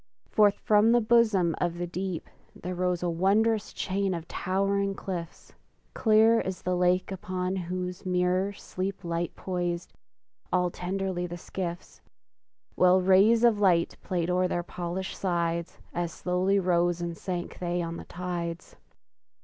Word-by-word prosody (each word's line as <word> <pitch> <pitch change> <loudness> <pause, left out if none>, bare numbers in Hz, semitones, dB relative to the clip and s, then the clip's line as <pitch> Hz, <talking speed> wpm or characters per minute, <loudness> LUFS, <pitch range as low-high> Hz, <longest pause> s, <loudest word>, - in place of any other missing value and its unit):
Forth 205 -1 +5
from 215 +3 +4
the 240 - +5
bosom 215 -7 +3
of 175 -1 0
the 175 - -2
deep 180 0 -4 0.3
There 180 +1 -5
rose 180 -1 -1
a - - +1
wondrous 210 +5 +2
chain 195 -1 -1
of 165 0 -7
towering 195 +1 0
cliffs, 175 -4 -6 0.4
Clear 225 0 +5
as 190 -1 -5
the 180 0 0
lake 180 +1 +2
upon 185 0 -3
whose 180 0 -4
mirror 180 +1 +1
sleep 195 0 -5
Light 170 0 -2
poised, 175 -2 -3 0.6
all 180 -1 +2
tenderly 185 0 -3
the 175 0 -6
skiffs; 175 0 -6 0.7
While 180 +1 +5
rays 195 +5 +5
of 230 -3 +5
light 180 -4 +3
played 180 -1 -1
o'er 180 0 +2
their 175 -1 -2
polished 180 +2 -4
sides, 170 -2 -1 0.2
As 170 -1 -2
slowly 185 +3 0
rose 175 -2 +2
and 170 -1 -3
sank 175 0 -5
they 175 0 -1
on 165 0 -4
the - - -8
tides. 175 -1 -5
180 Hz, 145 wpm, -28 LUFS, 175-195 Hz, 0.7 s, Forth